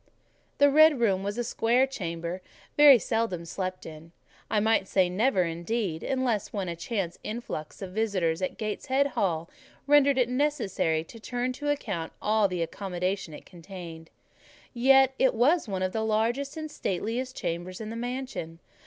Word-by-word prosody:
The 285 Hz, 0 st, +5 dB
red 310 Hz, -1 st, +6 dB
room 195 Hz, -5 st, +2 dB
was 200 Hz, +2 st, -3 dB
a 240 Hz, -, 0 dB
square 240 Hz, +2 st, +2 dB
chamber, 175 Hz, -8 st, -5 dB, 0.3 s
very 290 Hz, -3 st, +9 dB
seldom 225 Hz, -6 st, -2 dB
slept 185 Hz, +2 st, -4 dB
in, 160 Hz, +1 st, -11 dB, 0.4 s
I 215 Hz, -, +2 dB
might 220 Hz, -2 st, +2 dB
say 185 Hz, -2 st, +2 dB
never, 200 Hz, 0 st, +2 dB
indeed, 170 Hz, +1 st, -2 dB
unless 255 Hz, -5 st, -1 dB
when 195 Hz, -3 st, -3 dB
a 170 Hz, -, -3 dB
chance 175 Hz, 0 st, -3 dB
influx 210 Hz, -7 st, -6 dB
of 185 Hz, -, -6 dB
visitors 185 Hz, -5 st, 0 dB
at 185 Hz, -, -3 dB
Gateshead 260 Hz, +6 st, 0 dB
Hall 170 Hz, -9 st, -1 dB, 0.4 s
rendered 285 Hz, -1 st, +5 dB
it 250 Hz, -2 st, +3 dB
necessary 250 Hz, -, 0 dB
to 225 Hz, +7 st, -13 dB
turn 245 Hz, +2 st, -2 dB
to 290 Hz, +3 st, -4 dB
account 200 Hz, -, -2 dB
all 215 Hz, -1 st, +2 dB
the 180 Hz, -3 st, -2 dB
accommodation 180 Hz, -1 st, -3 dB
it -, -, -12 dB
contained: 170 Hz, -2 st, -10 dB, 0.6 s
yet 265 Hz, +2 st, +5 dB
it 265 Hz, -2 st, +3 dB
was 280 Hz, +7 st, +3 dB
one 190 Hz, -2 st, -2 dB
of 185 Hz, -, 0 dB
the 220 Hz, -, -2 dB
largest 230 Hz, +7 st, 0 dB
and 310 Hz, -1 st, -5 dB
stateliest 235 Hz, +5 st, -3 dB
chambers 175 Hz, +1 st, -4 dB
in 220 Hz, -1 st, -6 dB
the -, -, -6 dB
mansion. 245 Hz, -9 st, -5 dB
215 Hz, 160 wpm, -27 LUFS, 180-255 Hz, 0.6 s, very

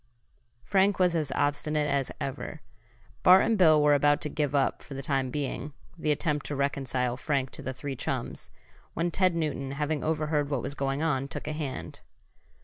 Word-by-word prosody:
Frank 195 Hz, +3 st, +3 dB
was 180 Hz, -2 st, +3 dB
as 155 Hz, -4 st, 0 dB
obstinate 145 Hz, +1 st, +1 dB
as 140 Hz, -2 st, 0 dB
ever. 145 Hz, +3 st, -5 dB, 0.6 s
Bart 185 Hz, +1 st, +7 dB
and 225 Hz, -, +2 dB
Bill 160 Hz, -6 st, +6 dB
were 150 Hz, 0 st, +5 dB
about 145 Hz, +1 st, +4 dB
to 150 Hz, -, -1 dB
give 150 Hz, -1 st, -1 dB
up, 135 Hz, -1 st, +1 dB
for 140 Hz, -, -10 dB
the 135 Hz, -, -5 dB
time 135 Hz, -2 st, 0 dB
being, 145 Hz, +1 st, -4 dB, 0.2 s
the 155 Hz, -2 st, -3 dB
attempt 150 Hz, -1 st, 0 dB
to 145 Hz, -, -3 dB
reconcile 130 Hz, -3 st, -1 dB
Frank 135 Hz, -1 st, -1 dB
to -, -, -6 dB
the 130 Hz, -, -4 dB
three 135 Hz, +1 st, -5 dB
chums, -, -, -4 dB, 0.5 s
when 170 Hz, +2 st, 0 dB
Ted 185 Hz, 0 st, +2 dB
Newton, 145 Hz, -4 st, -2 dB
having 150 Hz, +1 st, -1 dB
overheard 155 Hz, -2 st, 0 dB
what 140 Hz, -4 st, -1 dB
was 140 Hz, -, -4 dB
going 135 Hz, +1 st, -1 dB
on, 135 Hz, -4 st, 0 dB
took 140 Hz, -, -6 dB
a 155 Hz, -, -2 dB
hand. 145 Hz, -4 st, -5 dB
145 Hz, 185 wpm, -28 LUFS, 140-155 Hz, 0.6 s, Bart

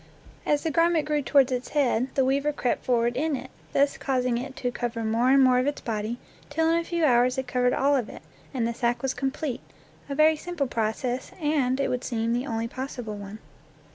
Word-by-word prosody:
As 295 Hz, -1 st, +2 dB
the 325 Hz, -, 0 dB
garment 330 Hz, 0 st, +3 dB
grew 300 Hz, -1 st, 0 dB
toward 275 Hz, -1 st, +3 dB
its 250 Hz, 0 st, -2 dB
head, 255 Hz, -3 st, +2 dB
the 270 Hz, -, +3 dB
weaver 280 Hz, +3 st, +1 dB
crept 255 Hz, -4 st, -1 dB
forward 240 Hz, -1 st, +2 dB
in 300 Hz, +3 st, 0 dB
it, 260 Hz, 0 st, -8 dB, 0.2 s
thus 280 Hz, 0 st, +2 dB
causing 250 Hz, -3 st, 0 dB
it 265 Hz, +2 st, -7 dB
to 245 Hz, -, -2 dB
cover 240 Hz, -1 st, -3 dB
more 225 Hz, +3 st, +2 dB
and 270 Hz, 0 st, +6 dB
more 255 Hz, -1 st, +5 dB
of 255 Hz, -, 0 dB
its 290 Hz, -, -1 dB
body 220 Hz, +1 st, -3 dB, 0.3 s
till 320 Hz, +2 st, +1 dB
in 335 Hz, -, +3 dB
a -, -, -3 dB
few 335 Hz, -1 st, 0 dB
hours 250 Hz, -1 st, +3 dB
it 265 Hz, -, -1 dB
covered 250 Hz, 0 st, +1 dB
all 280 Hz, +1 st, +3 dB
of 245 Hz, -5 st, -1 dB
it, -, -, -11 dB, 0.3 s
and 240 Hz, -4 st, -1 dB
the 235 Hz, -, -2 dB
sack 240 Hz, +2 st, -1 dB
was 270 Hz, -, 0 dB
complete, 270 Hz, -1 st, -3 dB, 0.5 s
a 280 Hz, -, -3 dB
very 310 Hz, +2 st, +5 dB
simple 340 Hz, -2 st, -3 dB
process, 240 Hz, +2 st, -2 dB
and, 285 Hz, -4 st, +1 dB
it 275 Hz, -, +1 dB
would 250 Hz, 0 st, -2 dB
seem, 230 Hz, -1 st, -1 dB
the 245 Hz, +3 st, -1 dB
only 225 Hz, 0 st, -2 dB
possible 250 Hz, -3 st, -6 dB
one. 205 Hz, +1 st, -8 dB
260 Hz, 220 wpm, -26 LUFS, 240-285 Hz, 0.5 s, and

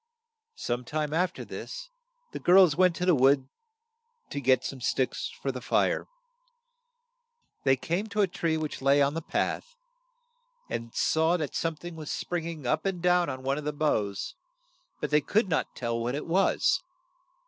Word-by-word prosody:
Some 120 Hz, +1 st, -3 dB
time 150 Hz, +3 st, -2 dB
af 180 Hz, +2 st, +2 dB
ter -, -, -8 dB
this, -, -, -8 dB, 0.4 s
the -, -, -5 dB
girls 180 Hz, -4 st, +6 dB
went 180 Hz, 0 st, +4 dB
to 180 Hz, -, -2 dB
the 180 Hz, -, +5 dB
wood 135 Hz, -1 st, +4 dB, 0.8 s
to 140 Hz, -, -3 dB
get 130 Hz, 0 st, +3 dB
some 135 Hz, -2 st, -5 dB
sticks 135 Hz, -, -1 dB
for -, -, 0 dB
the -, -, -7 dB
fire. -, -, +1 dB, 1.6 s
They 135 Hz, -1 st, +5 dB
came 175 Hz, +10 st, -2 dB
to 210 Hz, 0 st, 0 dB
a 200 Hz, -, +4 dB
tree 165 Hz, -2 st, -1 dB
which 155 Hz, -3 st, -4 dB
lay 140 Hz, +1 st, +4 dB
on 140 Hz, 0 st, +3 dB
the 165 Hz, -, -3 dB
path, -, -, -2 dB, 1.0 s
and 115 Hz, 0 st, -4 dB
saw 160 Hz, +2 st, +2 dB
that 150 Hz, -5 st, -4 dB
some 165 Hz, -1 st, -1 dB
thing 175 Hz, +2 st, -9 dB
was 155 Hz, -2 st, -7 dB
spring 175 Hz, -2 st, -3 dB
ing 160 Hz, -5 st, -7 dB
up 155 Hz, +5 st, +1 dB
and 190 Hz, -2 st, -2 dB
down 180 Hz, 0 st, +3 dB
on 130 Hz, 0 st, -5 dB
one 135 Hz, +2 st, 0 dB
of -, -, -7 dB
the 150 Hz, 0 st, -2 dB
boughs, 105 Hz, -10 st, -1 dB, 0.7 s
but -, -, -3 dB
they 150 Hz, 0 st, +4 dB
could 205 Hz, +9 st, +1 dB
not 160 Hz, -3 st, -1 dB
tell 115 Hz, -1 st, -2 dB
what 120 Hz, +3 st, -1 dB
it 150 Hz, -, -4 dB
was. 195 Hz, -, +2 dB
155 Hz, 180 wpm, -28 LUFS, 135-180 Hz, 1.6 s, girls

